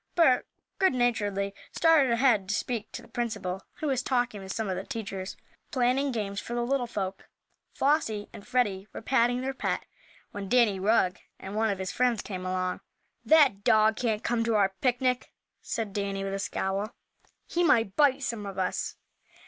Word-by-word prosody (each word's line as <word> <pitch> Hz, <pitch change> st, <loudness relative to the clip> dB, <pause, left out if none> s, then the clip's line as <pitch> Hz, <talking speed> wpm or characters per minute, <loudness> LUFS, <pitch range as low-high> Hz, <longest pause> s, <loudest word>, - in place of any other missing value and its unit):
Bert 290 Hz, -8 st, +4 dB, 0.3 s
goodnaturedly 220 Hz, -, +1 dB, 0.2 s
started 315 Hz, -6 st, +4 dB
ahead 235 Hz, -5 st, +3 dB
to 210 Hz, -, +1 dB
speak 235 Hz, -4 st, -3 dB
to -, -, -7 dB
the -, -, -15 dB
principal, 205 Hz, -6 st, -3 dB
who -, -, -6 dB
was 265 Hz, -4 st, +1 dB
talking 245 Hz, -5 st, 0 dB
with 190 Hz, 0 st, -6 dB
some 220 Hz, +1 st, -2 dB
of 190 Hz, -, -1 dB
the 185 Hz, -, -4 dB
teachers, 200 Hz, -6 st, -5 dB, 0.3 s
planning 265 Hz, +1 st, +1 dB
games 205 Hz, -4 st, -3 dB
for 240 Hz, -, -5 dB
the 240 Hz, -, 0 dB
little 260 Hz, -1 st, 0 dB
folk. 195 Hz, -4 st, -4 dB, 0.5 s
Flossie 225 Hz, -8 st, +1 dB
and 200 Hz, -, -11 dB
Freddie 205 Hz, -6 st, 0 dB
were -, -, -6 dB
patting 245 Hz, 0 st, +2 dB
their 265 Hz, +1 st, -2 dB
pet, -, -, -2 dB, 0.5 s
when 200 Hz, -1 st, -6 dB
Danny 230 Hz, -6 st, +4 dB
Rugg, 190 Hz, -2 st, +2 dB, 0.2 s
and 195 Hz, +2 st, -7 dB
one 220 Hz, +1 st, +2 dB
of 200 Hz, -, -1 dB
his 190 Hz, 0 st, -3 dB
friends 245 Hz, -3 st, +1 dB
came 185 Hz, -2 st, -5 dB
along. 185 Hz, 0 st, -1 dB, 0.4 s
"That 280 Hz, -11 st, +5 dB
dog 215 Hz, 0 st, +5 dB
can't 220 Hz, -2 st, -1 dB
come 235 Hz, -1 st, +1 dB
to 230 Hz, -1 st, +1 dB
our 195 Hz, -2 st, +3 dB
picnic!" 250 Hz, 0 st, +1 dB, 0.3 s
said 220 Hz, -4 st, -3 dB
Danny, 195 Hz, -1 st, -2 dB
with 195 Hz, 0 st, -3 dB
a 195 Hz, -, -2 dB
scowl. 195 Hz, +3 st, -2 dB, 0.5 s
"He 350 Hz, -, 0 dB
might 230 Hz, -, +3 dB
bite 280 Hz, -2 st, +4 dB
some 220 Hz, -6 st, -3 dB
of 195 Hz, -, -7 dB
us." 185 Hz, -1 st, -1 dB
220 Hz, 180 wpm, -28 LUFS, 195-250 Hz, 0.5 s, That